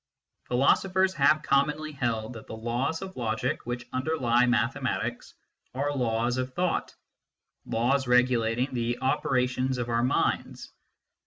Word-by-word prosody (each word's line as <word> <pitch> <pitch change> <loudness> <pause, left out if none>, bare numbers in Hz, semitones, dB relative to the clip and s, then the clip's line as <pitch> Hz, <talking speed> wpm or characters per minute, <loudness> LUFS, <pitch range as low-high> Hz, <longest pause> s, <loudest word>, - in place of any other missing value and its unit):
Philosophers 190 +9 +2
have 155 0 +3
commonly 150 +2 +1
held 120 -5 -2
that 110 - -11
the - - -7
laws 120 +9 -2
of 190 0 -8
logic, 110 -1 -2
which 120 0 -4
underlie 130 -3 +2
mathematics, 120 0 -1 0.4
are 145 +2 -1
laws 120 0 0
of 130 0 -4
thought, 180 -1 -1 0.7
laws 130 +4 +1
regulating 125 +1 +2
the 120 0 -1
operations 130 -1 0
of 120 -1 -3
our 115 0 +1
minds. 125 - -1
125 Hz, 125 wpm, -27 LUFS, 120-140 Hz, 0.7 s, have